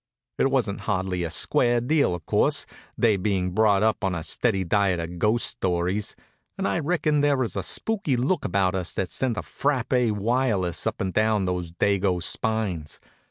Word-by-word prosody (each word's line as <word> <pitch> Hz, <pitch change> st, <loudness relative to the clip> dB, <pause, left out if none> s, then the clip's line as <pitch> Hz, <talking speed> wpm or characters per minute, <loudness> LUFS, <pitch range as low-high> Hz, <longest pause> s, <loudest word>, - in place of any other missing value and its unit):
It 135 Hz, -, +3 dB
wasn't 120 Hz, -7 st, 0 dB
hardly 95 Hz, -3 st, -1 dB
a 85 Hz, -, -2 dB
square 120 Hz, -, +2 dB
deal, 135 Hz, -, +1 dB
of 85 Hz, -, -10 dB
course, -, -, +2 dB, 0.3 s
they 110 Hz, -4 st, +3 dB
being 95 Hz, -2 st, -1 dB
brought 105 Hz, 0 st, +3 dB
up 110 Hz, -1 st, +1 dB
on 95 Hz, -2 st, 0 dB
a 80 Hz, -, -4 dB
steady 95 Hz, +2 st, 0 dB
diet 95 Hz, 0 st, +1 dB
of 85 Hz, +1 st, -6 dB
ghost 110 Hz, +5 st, +2 dB
stories; 90 Hz, +3 st, -1 dB, 0.4 s
and 195 Hz, -, -1 dB
I -, -, 0 dB
reckon 155 Hz, -2 st, +1 dB
there 145 Hz, -1 st, +3 dB
was 120 Hz, -7 st, -2 dB
a 100 Hz, -, -1 dB
spooky 195 Hz, -, -1 dB
look 145 Hz, +8 st, 0 dB
about 95 Hz, -1 st, +1 dB
us 95 Hz, -2 st, -3 dB
that 95 Hz, -, -2 dB
sent 125 Hz, -4 st, -1 dB
a -, -, -1 dB
frappé 125 Hz, -4 st, 0 dB
wireless 105 Hz, -4 st, 0 dB
up -, -, -3 dB
and 95 Hz, -1 st, -2 dB
down 110 Hz, -2 st, +2 dB
those 90 Hz, -2 st, -3 dB
dago 95 Hz, 0 st, +1 dB
spines. 100 Hz, -10 st, -2 dB
105 Hz, 180 wpm, -25 LUFS, 90-125 Hz, 0.4 s, It